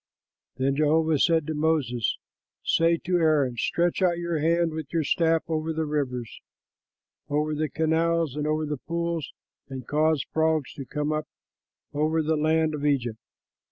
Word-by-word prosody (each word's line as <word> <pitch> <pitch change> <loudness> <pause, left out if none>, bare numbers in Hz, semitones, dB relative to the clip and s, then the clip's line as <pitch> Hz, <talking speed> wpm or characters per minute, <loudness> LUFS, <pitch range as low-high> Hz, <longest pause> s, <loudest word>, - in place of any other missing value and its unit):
'" - - -55
Then 135 +1 +1
Jehovah 155 0 +3
said 165 -1 +3
to 155 - -3
Moses, 150 -7 0 0.5
"Say 165 0 +3
to 180 0 +2
Aaron: 150 -7 +2
'Stretch 170 +9 0
out 175 -2 +3
your 170 -2 -2
hand 165 +2 +2
with 155 -2 -6
your 165 -2 +1
staff 165 +1 +2
over 160 0 -1
the 160 0 -1
rivers, 130 -6 -3 0.9
over 150 +1 0
the 155 0 -1
canals, 160 -2 +1
and 150 0 -2
over 155 0 0
the 150 -1 -3
pools, 170 +1 -3 0.4
and 130 -2 -7
cause 155 +1 +2
frogs 160 -3 +1
to 135 - -7
come 150 +3 -2
up 155 0 -2 0.7
over 155 +2 +1
the 160 +1 +1
land 155 +1 +2
of 145 -1 -4
Egypt.'" 125 -6 0
155 Hz, 160 wpm, -26 LUFS, 145-160 Hz, 0.9 s, Jehovah